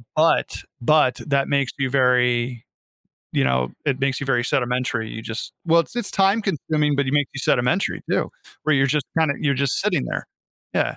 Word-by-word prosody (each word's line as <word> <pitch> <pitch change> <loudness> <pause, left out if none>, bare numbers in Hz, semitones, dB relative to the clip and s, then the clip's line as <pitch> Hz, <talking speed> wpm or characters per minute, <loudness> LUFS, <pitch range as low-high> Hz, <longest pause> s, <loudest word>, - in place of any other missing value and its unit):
but 160 +1 +2 0.2
but 145 0 +4
that 140 -1 +1
makes 140 -2 +1
you 130 -1 0
very, 125 -2 +2 0.7
you 65 - +2
know, 65 -1 +1
it 140 -3 0
makes 135 -1 0
you 140 - -4
very 120 -3 +1
sedimentary, 125 -3 -1
you 110 - -6
just 115 +1 -6
well, 170 +1 +5
it's - - -6
just 240 -4 -4
time 195 +3 +3
consuming 155 -6 0
but 140 - +1
it 130 - -2
makes 145 -2 +2
you 135 - -5
sedimentary 125 +8 +1
too, - - 0 0.3
where 155 -2 +2
you're 135 0 +3
just 140 0 0
kinda 155 -3 +2
you're 145 -2 +1
sitting 65 - 0
there, - - -4 0.5
yeah. - - 0
135 Hz, 185 wpm, -22 LUFS, 125-150 Hz, 0.7 s, well